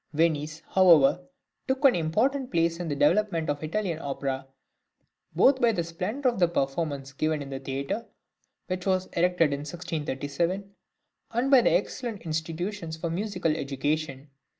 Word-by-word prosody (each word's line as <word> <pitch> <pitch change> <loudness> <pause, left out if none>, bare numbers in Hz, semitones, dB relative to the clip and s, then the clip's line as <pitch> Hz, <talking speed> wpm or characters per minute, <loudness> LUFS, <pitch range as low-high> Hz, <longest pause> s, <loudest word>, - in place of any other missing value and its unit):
Venice, 155 0 0
however, 175 -5 +5 0.5
took 265 +2 0
an 265 - +8
important 245 - 0
place 165 -1 +1
in 175 - -3
the 145 - -1
development 165 +1 +2
of 145 - -4
Italian 170 0 -2
opera, 135 -2 -3 0.9
both 265 0 +5
by 235 -1 +5
the 175 -6 -1
splendour 210 +11 -1
of 235 - -7
the 175 - +5
performances 140 -2 -2
given 155 +2 0
in 140 -1 -7
the 135 - -4
theatre, 140 - -4 0.6
which 185 0 -4
was 185 -1 +2
erected 170 -3 +3
in 140 - -2
1637, 165 +4 -3 0.6
and 250 +4 +1
by 270 - +9
excellent 235 -2 0
institutions 165 +2 -4
for 165 0 -3
musical 180 -4 -1
education. 140 0 -3
165 Hz, 145 wpm, -27 LUFS, 145-195 Hz, 0.9 s, by